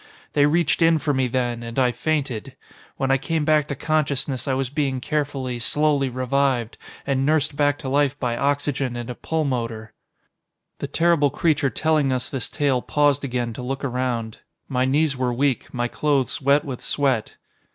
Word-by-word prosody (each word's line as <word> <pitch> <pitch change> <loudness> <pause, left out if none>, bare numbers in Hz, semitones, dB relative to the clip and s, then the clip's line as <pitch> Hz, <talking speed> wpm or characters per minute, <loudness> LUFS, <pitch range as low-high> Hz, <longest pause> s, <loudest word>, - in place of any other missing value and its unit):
"They 145 -1 +4
reached 165 +1 +2
in 165 0 +5
for 150 -1 0
me 130 -1 +1
then, 120 -1 -1
and 115 +1 -7
I 125 -2 +3
fainted. 135 -2 -2 0.4
When 135 0 0
I 135 - +3
came 160 +1 -1
back 155 -1 +3
to 140 - -3
consciousness 140 -3 -1
I 135 - +1
was 130 -1 -2
being 140 -3 -1
carefully, 135 -3 -2
slowly 145 +2 +1
revived, 130 -1 0 0.3
and 135 -1 0
nursed 150 0 +2
back 145 0 +2
to 135 - -7
life 140 +1 +1
by 120 -2 -1
oxygen 140 -1 -1
and 120 0 -5
a - - -4
pulmotor." 120 -8 -3 0.9
The 140 - -3
terrible 165 -1 +3
creature 145 -1 +1
telling 150 +2 +1
us 130 -1 -1
this 130 -5 -3
tale 135 -4 +1
paused 145 0 +2
again 120 -3 -2
to 120 - -7
look 135 +3 -4
around. 125 -4 -2 0.3
My 130 -1 +1
knees 145 +2 +2
were 130 -1 0
weak, 130 +1 0
my 120 -1 -1
clothes 140 0 0
wet 140 +3 +3
with 130 -4 -5
sweat. 135 -6 0
135 Hz, 175 wpm, -23 LUFS, 125-145 Hz, 0.9 s, in